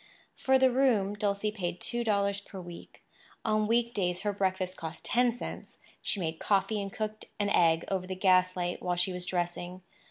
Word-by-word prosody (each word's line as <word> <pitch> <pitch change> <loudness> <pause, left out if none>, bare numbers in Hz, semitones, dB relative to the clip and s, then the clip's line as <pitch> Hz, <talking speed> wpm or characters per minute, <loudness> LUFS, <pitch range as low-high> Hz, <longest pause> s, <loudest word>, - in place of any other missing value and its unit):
For 265 0 +3
the 260 -1 +4
room, 240 -7 +3
Dulcie 205 0 0
paid 180 -4 -4
two 240 0 -2
dollars 200 -2 +1
per 195 -1 -10
week. 175 -1 -11 0.4
On 215 -1 +2
week 235 +1 +2
days 180 -2 0
her 205 -1 -1
breakfast 185 -2 -1
cost 160 0 -7
ten 245 0 +3
cents; 240 - -8 0.2
she 205 - -1
made 160 -2 -3
coffee 205 +1 +1
and 195 0 -5
cooked 215 +1 -4
an 205 0 +1
egg 165 -3 +4
over 185 -2 -2
the 185 - -3
gaslight 185 -1 +2
while 180 -1 0
she 180 +1 +1
was 180 0 -4
dressing. 175 0 -3
195 Hz, 185 wpm, -30 LUFS, 180-215 Hz, 0.4 s, the